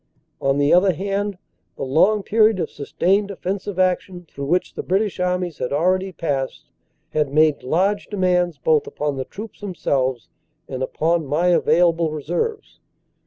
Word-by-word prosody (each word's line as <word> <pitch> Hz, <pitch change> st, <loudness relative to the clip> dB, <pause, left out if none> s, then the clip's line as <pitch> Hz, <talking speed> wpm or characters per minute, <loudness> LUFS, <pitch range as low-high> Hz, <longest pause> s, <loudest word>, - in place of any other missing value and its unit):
"On 135 Hz, 0 st, +2 dB
the 145 Hz, +1 st, +3 dB
other 185 Hz, +1 st, +5 dB
hand, 200 Hz, +2 st, -2 dB, 0.4 s
the -, -, -5 dB
long 185 Hz, +10 st, +3 dB
period 215 Hz, -1 st, +3 dB
of -, -, -2 dB
sustained 195 Hz, +8 st, 0 dB
offensive 195 Hz, 0 st, -4 dB
action 185 Hz, -1 st, 0 dB
through 140 Hz, -2 st, -6 dB
which 180 Hz, +4 st, 0 dB
the -, -, -4 dB
British 195 Hz, +1 st, -1 dB
Armies 180 Hz, -2 st, -1 dB
had 125 Hz, -, -2 dB
already 185 Hz, +6 st, +1 dB
passed 140 Hz, -7 st, -3 dB, 0.4 s
had 150 Hz, -3 st, 0 dB
made 155 Hz, 0 st, +3 dB
large 190 Hz, +10 st, 0 dB
demands 180 Hz, -3 st, +1 dB
both 455 Hz, -2 st, +2 dB
upon 150 Hz, -, -3 dB
the 130 Hz, -, -3 dB
troops 215 Hz, -, -10 dB
themselves 135 Hz, -, -1 dB, 0.4 s
and 130 Hz, -1 st, -5 dB
upon 160 Hz, +4 st, 0 dB
my 160 Hz, +6 st, +2 dB
available 170 Hz, -1 st, +3 dB
reserves. 175 Hz, -, -3 dB
180 Hz, 150 wpm, -21 LUFS, 150-195 Hz, 0.4 s, other